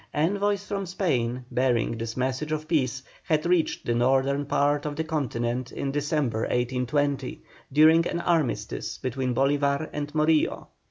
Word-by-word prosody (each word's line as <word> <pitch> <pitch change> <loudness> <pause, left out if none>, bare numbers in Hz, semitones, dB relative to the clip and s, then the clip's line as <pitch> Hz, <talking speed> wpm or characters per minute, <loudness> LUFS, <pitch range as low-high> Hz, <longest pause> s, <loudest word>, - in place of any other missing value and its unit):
Envoys 200 +5 +1
from 195 -2 -3
Spain 125 - -1
bearing 125 -2 +1
this 115 +1 -5
message 130 +4 -1
of 155 0 -2
peace 130 -5 0 0.2
had 155 0 0
reached 175 -2 +1
the 120 - +1
northern 135 +3 +2
part 145 0 +2
of 150 -1 -3
the 160 - -1
continent 130 -5 -2
in 135 - -3
December, 145 -5 0
1820, 130 +3 -1 0.3
during 160 +4 +6
an 170 - -2
armistice 165 -6 -1
between 130 -1 -2
Bolívar 140 +2 +1
and 145 0 -4
Morillo. 155 0 +2
145 Hz, 145 wpm, -26 LUFS, 125-155 Hz, 0.3 s, during